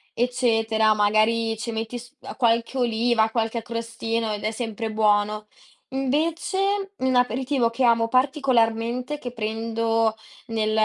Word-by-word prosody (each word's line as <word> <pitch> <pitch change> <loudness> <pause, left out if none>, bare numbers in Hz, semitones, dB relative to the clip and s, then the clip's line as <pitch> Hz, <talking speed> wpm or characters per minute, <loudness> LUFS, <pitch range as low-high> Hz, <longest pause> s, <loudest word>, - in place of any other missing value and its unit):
eccetera. 225 -3 +2
Magari 220 +2 +2
ci 230 +1 -4
metti 225 +2 -4
s 245 +4 -14
uhm, - - -8
qualche 235 +1 +1
oliva, 230 -1 +2
qualche 225 0 -1
a - - -8
crostino 230 -1 -3
ed 205 - -5
è 215 - +1
sempre 225 -1 -4
buono. 210 0 +1 0.4
Invece, 335 +9 -1
un 260 -1 0
aperitivo 250 0 +1
che 250 +3 -2
amo 230 -1 +4
particolarmente, 255 0 +1
che 245 -3 -6
prendo 225 0 -1 0.3
nel 220 -1 -1
230 Hz, 135 wpm, -24 LUFS, 220-250 Hz, 0.4 s, amo